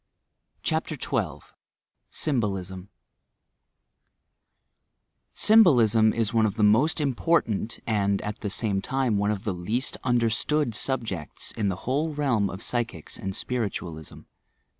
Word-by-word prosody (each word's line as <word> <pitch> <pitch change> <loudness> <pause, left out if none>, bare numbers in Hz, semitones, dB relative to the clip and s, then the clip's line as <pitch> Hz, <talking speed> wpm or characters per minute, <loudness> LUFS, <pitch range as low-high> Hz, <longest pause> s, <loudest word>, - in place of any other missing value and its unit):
' - - -47
CHAPtBR - - -2
XII - - -23 0.6
SYMBOLISM 95 - -2 2.5
Symbolism 120 - +5
is 115 0 0
one 110 -1 +4
of 100 - -4
the 110 - 0
most 115 +11 +4
important 130 -6 0
and 100 -3 +1
at 105 +1 -5
the 105 - -3
same 100 -1 -1
time 130 -5 0
one 100 +1 +1
of 105 -2 -2
the 105 - -1
least 105 +9 -2
understood 120 +3 +1
subjects 105 - -2
in 105 -3 -1
the 95 - -1
whole 150 +4 -1
realm 125 -9 +1
of 95 - -7
psychics 115 -10 -2
and 95 0 -4
spiritualism. 90 - -4
110 Hz, 120 wpm, -26 LUFS, 100-130 Hz, 2.5 s, Symbolism